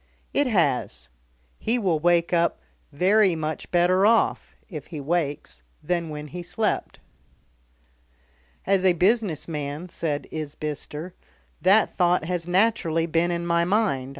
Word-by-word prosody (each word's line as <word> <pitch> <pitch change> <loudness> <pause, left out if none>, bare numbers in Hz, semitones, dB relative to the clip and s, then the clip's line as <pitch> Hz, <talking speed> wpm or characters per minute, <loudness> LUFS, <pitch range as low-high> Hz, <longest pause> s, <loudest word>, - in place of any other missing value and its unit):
"It 285 -1 +2
has. 175 - 0 0.5
He 235 +3 0
will 185 -9 +1
wake 170 +1 +2
up 170 0 +2 0.3
very 190 +4 +3
much 155 -1 -4
better 180 +2 +3
off 225 +2 +2
if 155 -8 -8
he 155 - -7
wakes 145 - -2 0.2
than 170 0 -1
when 150 0 -7
he 180 +3 -6
slept." 210 +5 -2 1.7
"As 195 -1 +2
a 185 -1 +5
business 190 -1 +1
man," 150 +2 -5
said 150 -4 -3
Isbister, 150 +2 -5 0.5
"that 200 +4 +4
thought 175 -2 +2
has 175 0 -3
naturally 180 -4 +2
been 170 +1 +1
in 170 0 -2
my 170 0 +2
mind. 180 -9 0
175 Hz, 130 wpm, -24 LUFS, 155-190 Hz, 1.7 s, a